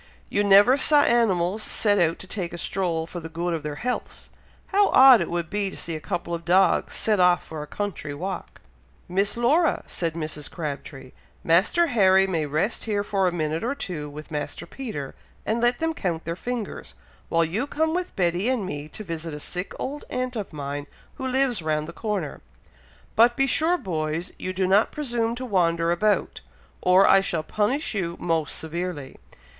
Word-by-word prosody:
You 205 - +1
never 205 +6 +6
saw 290 +1 +5
animals 205 -5 +2
set 205 -1 +1
out 165 -1 +2
to - - -8
take 185 -3 -4
a - - -5
stroll 170 -3 -1
for 175 +1 -7
the 165 -1 -8
good 170 +2 -2
of 165 - -2
their 150 -1 -5
healths! 250 +10 -4 0.4
How 405 0 +4
odd 260 -2 +8
it - - -2
would 170 -1 -2
be 205 +2 -1
to - - -9
see 165 - -3
a - - -4
couple 175 0 -4
of 170 0 -3
dogs 185 +3 +3
set 215 -3 +1
off 180 -1 +4
for 155 -2 -7
a 150 - -7
country 195 -5 -4
walk!" 185 +4 -6 0.5
"Miss 195 +4 0
Laura!" 300 +8 +2
said 165 -2 -3
Mrs. 155 -2 -4
Crabtree, 140 -4 -6 0.3
"Master 190 - +3
Harry 195 - +4
may 165 -5 -1
rest 155 +10 -1
here 205 -2 0
for 195 -2 +1
a - - +1
minute 160 0 -2
or 260 +4 -1
two 165 - -5
with 150 +2 -10
Master 150 -1 -4
Peter, 215 - -6 0.3
and 225 +2 0
let 240 +1 +3
them 325 0 -1
count 175 - -3
their 165 +1 -3
fingers, 240 +2 -5 0.3
while 165 0 +3
you 210 - -2
come 315 +2 0
with 360 +1 -3
Betty 180 +3 +1
and 250 -6 0
me 145 -4 -5
to 215 - -7
visit 165 -4 -5
a - - -7
sick 180 +5 -4
old 290 +3 -5
aunt 255 0 -3
of 210 -4 -4
mine 145 -1 -5 0.3
who 265 - -3
lives 260 -5 +1
round 155 -1 -1
the 170 - -8
corner; 210 +1 -3 0.7
but 240 +1 +5
be 270 - +4
sure, 320 +6 +2
boys, 160 - -3
you 185 - -3
do 185 0 0
not 195 +4 +3
presume 235 -5 -1
to 255 +1 -5
wander 170 -6 +1
about, 205 +4 0 0.4
or 185 +2 +5
I 195 - +6
shall 170 -5 -1
punish 215 - -1
you 175 -4 -2
most 165 -3 -1
severely. 160 -4 -5
185 Hz, 195 wpm, -25 LUFS, 165-230 Hz, 0.7 s, odd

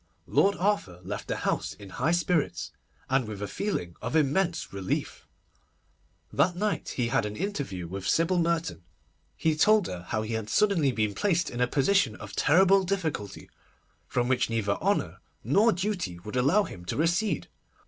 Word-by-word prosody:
Lord 200 0 +3
Arthur 185 - 0
left 100 +3 -5
the - - -1
house - - -1
in 100 -2 -12
high 125 - -1
spirits, 175 -2 0 0.4
and 130 -3 +1
with 105 -2 -6
a 105 - -3
feeling 90 - -3
of 125 +5 -3
immense 160 - +1
relief. 95 -1 -3 1.1
That 175 0 +2
night 205 +2 -2
he 120 -2 0
had 115 - +2
an 105 0 -4
interview 140 - -3
with 95 +2 -5
Sybil 170 +2 +2
Merton. 165 - 0 0.6
He 160 -1 +1
told 210 +5 +4
her 90 -1 -6
how 110 0 -1
he 110 +1 -4
had 110 -1 -2
been - - -19
suddenly 140 - +2
placed 175 - 0
in 120 - -4
a 125 - +4
position 135 - +2
of 105 -2 -10
terrible 190 +5 +5
difficulty, 165 - -3 0.6
from 120 -1 0
which 125 -2 +1
neither 110 -3 0
honour 200 +3 0 0.2
nor 220 +4 +4
duty 180 - -2
would 105 +4 -7
allow 140 +12 +4
him 90 - -9
to - - -3
recede. 170 +2 +1
150 Hz, 170 wpm, -28 LUFS, -, 1.1 s, terrible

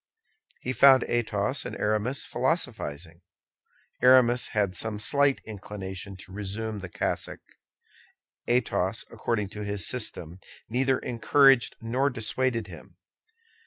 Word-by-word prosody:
He 130 - -3
found 135 -1 +7
Athos 120 +2 -1
and - - -6
Aramis 110 +6 0
philosophizing. 110 - -2 0.8
Aramis 125 -1 +5
had 100 -3 -1
some 110 +2 -3
slight 140 +5 +2
inclination 100 -2 -7
to 95 - -14
resume 105 +2 -4
the 95 -2 -8
cassock. - - -3 1.1
Athos, 110 -4 0
according 105 -4 -2
to 105 +1 -7
his 100 -3 0
system, 95 -8 -3 0.3
neither 130 +3 +1
encouraged 135 +2 +3
nor 130 +5 +1
dissuaded 120 -1 -1
him. 90 -1 -13
110 Hz, 110 wpm, -27 LUFS, 100-125 Hz, 1.1 s, found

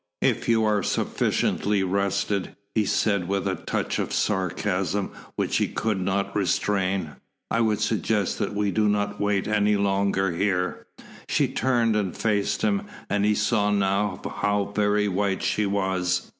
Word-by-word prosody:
"If - - +1
you 115 -1 +4
are 105 -1 +2
sufficiently 100 +1 0
rested," 100 +1 -1 0.2
he 110 -2 +2
said 100 -5 +1
with 100 +1 -1
a 95 - +1
touch - - -2
of - - -2
sarcasm 95 0 -1 0.2
which - - 0
he - - +1
could 105 -4 -1
not 95 +2 -1
restrain, 95 -4 0 0.3
"I 115 - +2
would 110 -2 +1
suggest 105 -2 0
that - - -2
we 100 -1 +1
do 105 +2 +2
not 105 0 -1
wait 100 -1 +1
any 105 -1 +2
longer 100 -1 +1
here." 90 +1 -1 0.4
She - - +2
turned 120 -4 +1
and 100 -4 -1
faced 105 - 0
him, 205 -1 +1 0.2
and 100 0 +2
he 105 0 +3
saw 105 -2 +2
now 100 0 +1 0.2
how 105 0 0
very 105 0 +2
white 100 0 0
she 105 -1 +1
was. 95 -2 0
100 Hz, 155 wpm, -25 LUFS, 95-105 Hz, 0.4 s, you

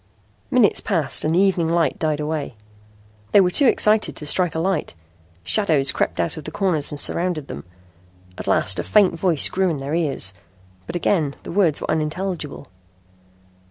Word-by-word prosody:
Minutes 250 -6 +3
passed 165 -10 0
and 155 +2 0
the - - +3
evening 185 -4 +2
light 170 -1 0
died 155 -2 -1
away. 150 -4 -4 0.8
They - - +7
were 180 -1 +2
too 275 +8 +4
excited 215 -2 +2
to 150 - -6
strike 170 +2 +1
a - - -1
light. 175 - -2 0.5
Shadows 150 - +2
crept - - -2
out 85 - -1
of 155 - -7
the 155 - -7
corners 165 -4 -1
and 145 - -1
surrounded 170 -2 0
them. 70 - -8 0.7
At - - -8
last 95 - +2
a - - -1
faint 205 -4 +3
voice 170 -3 +2
grew 190 0 0
in 160 - -2
their 140 +2 -5
ears. 145 - +1 0.5
But - - -6
again 165 -5 0
the - - -8
words 170 -5 +1
were - - -3
unintelligible. 160 0 -3
165 Hz, 175 wpm, -21 LUFS, 150-190 Hz, 0.8 s, They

